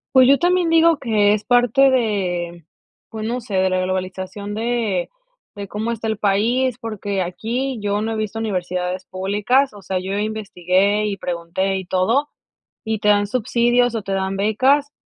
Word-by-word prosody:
Pues 260 -1 +7
yo 275 +1 +6
también 355 0 +2
digo 330 -1 +5
que 210 -4 +3
es 210 0 -2
parte 245 +2 +4
de 180 - -1 0.4
pues 220 -1 -6
no 245 +2 -2
sé, 210 -4 -6
de 190 0 +3
la 185 0 0
globalización 185 +2 -4
de 225 -5 -1 0.4
de 200 -1 -7
cómo 220 +4 -3
está 225 -1 -4
el 220 -2 -1
país, 225 +5 +1
porque 205 -3 -3
aquí 235 +9 -3
yo 205 0 -1
no 225 +1 -2
he - - -3
visto 215 0 -3
universidades 180 -3 -3
públicas, 210 +8 0
o 205 - -12
sea, 185 0 -2
yo 190 +2 -3
investigué 205 -1 0
y 200 -1 -3
pregunté 180 +2 -2
y 190 - -4
todo, 225 +12 +1 0.6
y 220 -1 -1
te 210 - +1
dan 205 0 +3
subsidios 240 +1 +1
o 225 - -2
te 195 - -3
dan 190 0 -1
becas, 265 +8 +2
210 Hz, 175 wpm, -20 LUFS, 190-240 Hz, 0.6 s, Pues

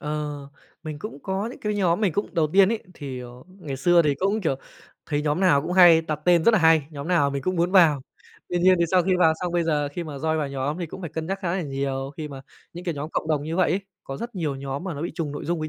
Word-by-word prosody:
Ờ, 150 -2 -4 0.3
mình 155 -3 -6
cũng 210 -2 -7
có 195 +2 -2
những - - -11
cái 210 0 -2
nhóm 185 -2 +1
mình 200 -6 +2
cũng 205 - -3
đầu 160 -2 +3
tiên 195 0 +6
ấy, 225 0 -2
thì, 135 -5 -6
à, - - -8 0.3
ngày 145 -6 -5
xưa 175 +5 +4
thì 145 -3 +1
cũng, 200 +7 0
kiểu, 160 -8 0 0.5
thấy 150 -1 -1
nhóm 150 +3 0
nào 165 -7 +4
cũng 180 - -3
hay 175 -3 +7
đặt 155 -2 -4
tên 175 -2 +4
rất - - +7
nà 215 - +4
hay, 160 -4 +4
nhóm 145 0 -7
nào 165 -6 +3
mình 140 -1 -3
cũng 185 +5 -1
muốn 170 +1 +1
vào. 165 -7 +5 0.5
Tuy 175 - -1
nhiên 185 +2 +5
thì 170 - +3
sau 185 -1 +4
khi 190 - +1
vào 160 -3 +5
xong, 180 -1 -2
bây 175 - +2
giờ 150 -3 0
khi 175 +3 -4
mà 150 -3 -7
join 160 +3 -1
vào 150 -2 -1
nhóm 140 +4 -3
thì 170 - -3
cũng 170 - -9
phải 170 -5 -6
cân 160 0 -4
nhắc 195 +1 -2
khá 175 -3 -2
là 190 - -2
nhiều 135 -2 -3
khi 155 -2 -5
mà 135 -2 -8 0.3
những 175 +1 -9
cái 170 -4 -2
nhóm 150 +3 -5
cộng - - -3
đồng 150 -2 +1
như 160 +3 -4
vậy 185 - +3
ấy. 190 - +1 0.2
Có 135 - -6
rất 235 +6 -7
nhiều 160 -7 -2
nhóm 135 +3 -5
mà 185 -5 -4
nó 145 - -5
bị 175 - -3
trùng 160 -5 -3
nội 145 - -6
dung 170 -1 -1
với 155 - -3
160 Hz, 300 wpm, -24 LUFS, 145-180 Hz, 0.5 s, hay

